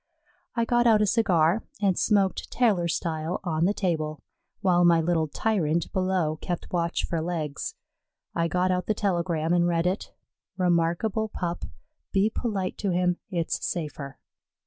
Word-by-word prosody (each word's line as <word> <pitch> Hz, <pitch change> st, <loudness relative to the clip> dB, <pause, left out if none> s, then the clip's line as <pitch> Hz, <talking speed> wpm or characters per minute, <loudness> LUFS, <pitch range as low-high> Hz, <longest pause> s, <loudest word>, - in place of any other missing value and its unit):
I 235 Hz, -1 st, +1 dB
got 240 Hz, 0 st, +3 dB
out 215 Hz, -2 st, +5 dB
a -, -, +4 dB
cigar 190 Hz, -3 st, +3 dB, 0.2 s
and 195 Hz, -3 st, +2 dB
smoked 195 Hz, -2 st, +1 dB
tailor 210 Hz, -8 st, +2 dB
style 160 Hz, 0 st, -2 dB
on 165 Hz, -2 st, +1 dB
the 200 Hz, -, +2 dB
table, 155 Hz, -5 st, -2 dB, 0.4 s
while 175 Hz, -2 st, +4 dB
my 170 Hz, -1 st, +6 dB
little 165 Hz, -1 st, +1 dB
tyrant 170 Hz, -3 st, 0 dB
below 185 Hz, -5 st, 0 dB
kept 175 Hz, -2 st, -4 dB
watch 170 Hz, -1 st, 0 dB
for 165 Hz, -2 st, -2 dB
legs. 160 Hz, -, -3 dB, 0.6 s
I 170 Hz, 0 st, +1 dB
got 180 Hz, +2 st, +1 dB
out 180 Hz, 0 st, -1 dB
the 215 Hz, -, +1 dB
telegram 170 Hz, -5 st, 0 dB
and 175 Hz, 0 st, +3 dB
read 170 Hz, -1 st, +1 dB
it: 185 Hz, +3 st, -1 dB, 0.5 s
"Remarkable 180 Hz, +5 st, +1 dB
pup. 175 Hz, -4 st, -3 dB, 0.5 s
Be 200 Hz, +2 st, +2 dB
polite 200 Hz, -7 st, -2 dB
to 200 Hz, -, -1 dB
him; 180 Hz, 0 st, +1 dB
it's 170 Hz, -4 st, -2 dB
safer." 150 Hz, -4 st, -4 dB
175 Hz, 150 wpm, -26 LUFS, 165-195 Hz, 0.6 s, my